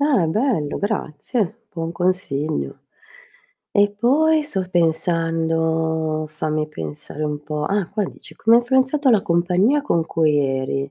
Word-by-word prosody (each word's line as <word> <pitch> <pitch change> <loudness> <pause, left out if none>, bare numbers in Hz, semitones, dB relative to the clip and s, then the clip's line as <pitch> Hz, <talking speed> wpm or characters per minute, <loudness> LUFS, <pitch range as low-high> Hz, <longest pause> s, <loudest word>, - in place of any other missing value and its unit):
Ah 275 - +3
bello 185 - 0
grazie, 210 - -2
buon 165 -2 -4
consiglio. 160 - -1 0.9
E 205 0 +3
poi 300 +8 +3
sto 200 -11 -2
pensando, 160 -1 0
fammi 155 0 -2
pensare 80 - -6
un 150 -1 -3
po', 150 0 -3
ah 195 0 0
qua 210 +1 -1
dici: - - -9
"Come 230 +1 +5
ha - - +7
influenzato 265 +3 +2
la 210 -4 +4
compagnia 180 +11 +2
con 170 - +1
cui 155 -2 +2
eri? 135 0 -1
170 Hz, 130 wpm, -21 LUFS, 155-215 Hz, 0.9 s, ha